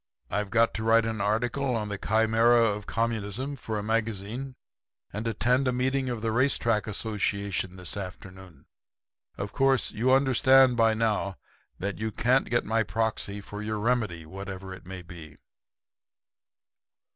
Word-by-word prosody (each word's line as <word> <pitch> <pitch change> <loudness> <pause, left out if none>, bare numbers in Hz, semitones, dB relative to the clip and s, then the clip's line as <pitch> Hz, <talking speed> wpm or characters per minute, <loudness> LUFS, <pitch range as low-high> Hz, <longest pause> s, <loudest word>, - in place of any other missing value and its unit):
I've 105 -1 -1
got 115 +2 +3
to 110 - -4
write 115 0 +4
an 110 -2 -2
article 120 +5 0
on 105 -2 -2
the 100 - -3
Chimera 115 +2 +4
of 105 -2 -1
Communism 115 +4 -2
for 110 -4 -4
a 105 - -3
magazine, 115 +4 -2 0.6
and 105 +3 -3
attend 125 +4 +1
a - - +3
meeting 130 +1 0
of 120 -3 -4
the 115 - 0
Race 130 +4 +2
Track 115 -3 0
Association 100 -3 -2
this 90 -2 -4
afternoon. 95 -2 -9 0.7
Of 100 0 -5
course 135 -2 +2
you 125 +4 +1
understand 130 -1 +5
by 115 -1 +3
now 105 -3 0 0.4
that 100 +2 -4
you 110 0 -2
can't 125 +6 +2
get 120 - +1
my 115 +1 +1
proxy 110 -2 -2
for 105 +1 -8
your 110 0 -3
Remedy, 105 -7 -1
whatever 95 +2 -7
it 95 - -12
may 95 -1 -7
be.' 80 -4 -12
110 Hz, 155 wpm, -27 LUFS, 100-120 Hz, 0.7 s, understand